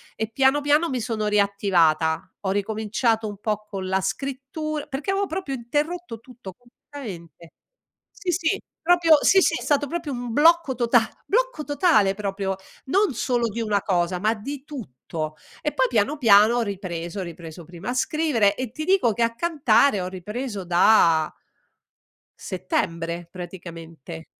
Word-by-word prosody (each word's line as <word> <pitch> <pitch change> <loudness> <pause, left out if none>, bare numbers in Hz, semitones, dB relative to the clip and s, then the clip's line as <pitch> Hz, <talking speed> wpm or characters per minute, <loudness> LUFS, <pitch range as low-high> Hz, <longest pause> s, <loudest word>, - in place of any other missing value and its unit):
E, 220 0 -3
piano 270 +3 +3
piano, 295 +3 +3
mi 255 -4 -2
sono 220 -2 -2
riattivata. 190 -6 +2
Ho 190 - +1
ricominciato 220 +2 0
un 205 -1 -8
po' 210 -1 -2
con 190 -2 -5
la 190 - +2
scrittur 275 - -4
perché 290 +6 -3
avevo 395 +1 +1
proprio 320 -6 -4
interrotto 295 +1 -3
tutto, 240 -6 -11
completamente. 205 - -11 0.6
Sì, 370 -3 -4
sì, 355 +3 0 0.2
proprio 335 -2 +5
Sì, 390 - +5
sì, - - +3
è - - -9
stato 290 -1 +1
proprio 315 0 -4
un 245 -2 -5
blocco 325 0 +4
tota 235 -2 +3 0.2
blocco - - 0
totale 290 - +3
proprio, 195 -1 -3 0.3
non 390 +4 +2
solo 240 0 0
di 230 +2 -4
una 210 -3 0
cosa, 180 -1 0
ma 215 +4 +1
di 265 +6 -7
tutto. 155 - -6 0.3
E 300 - -1
poi, 260 -1 +2
piano 235 +6 +1
piano 220 -2 +6
ho 240 - +2
ripreso, 185 -3 -5
ho - - -2
ripreso 170 -1 -9
prima 175 +6 -8
a - - -1
scrivere 255 -7 +1
e 255 -3 -4
ti 310 +5 -5
dico 370 - +3
che 235 - 0
a 230 0 0
cantare 280 - +3
ho 180 - -3
ripreso 205 +3 -5
da 170 -3 +4 1.0
settembre 170 -2 -3
praticamente, 165 -3 -9
225 Hz, 155 wpm, -24 LUFS, 190-285 Hz, 1.0 s, piano